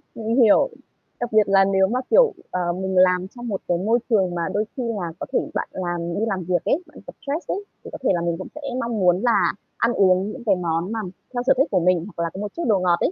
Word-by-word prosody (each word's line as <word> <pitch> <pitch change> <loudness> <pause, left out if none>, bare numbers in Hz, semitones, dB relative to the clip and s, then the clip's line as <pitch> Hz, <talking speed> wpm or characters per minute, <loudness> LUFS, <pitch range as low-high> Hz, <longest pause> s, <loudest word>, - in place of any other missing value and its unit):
mình 225 +1 -2
hiểu. 230 - +5 0.5
Đặc 240 -1 -3
biệt 215 -1 +5
là 195 -1 +5
nếu 190 -1 +3
mà, 250 +4 -1
kiểu, 485 -3 +5 0.2
ờ, 175 -1 -1
mình 190 +1 -3
làm 180 0 +4
trong 240 0 -7
một 200 -4 -3
cái 175 - +1
môi 225 +6 +2
trường 190 -5 +2
mà 170 - -2
đôi 215 +1 0
khi 255 - -2
là 200 -8 -3
có - - -4
thể - - +4
bạn - - -2
làm 175 -1 -3
đi 220 - +1
làm 190 -4 -2
việc 175 -1 -1
ấy, 350 +5 +1
bạn 300 - -17
gặp - - -8
stress 295 +4 -4
ấy, 400 - -3 0.2
thì - - -9
có - - -6
thể - - +2
là 175 - 0
mình 170 -1 -1
cũng - - -7
sẽ 305 - -8 0.2
mong 230 -3 -2
muốn 180 +1 +3
là 240 -2 +3 0.2
ăn 235 +1 +1
uống 190 +1 +3
những 245 - -9
cái 200 -3 +4
món 170 +1 -2
mà 225 - -2 0.3
theo 245 0 -2
sở - - +7
thích 275 +4 +3
của 185 - +3
mình, 175 0 +2
hoặc 170 - -1
là 165 - -1
có 190 - -7
một 210 -1 -5
chút 340 - -3
đồ 205 -4 +3
ngọt 175 -1 +2
ấy. - - +1
195 Hz, 280 wpm, -22 LUFS, 180-230 Hz, 0.5 s, sở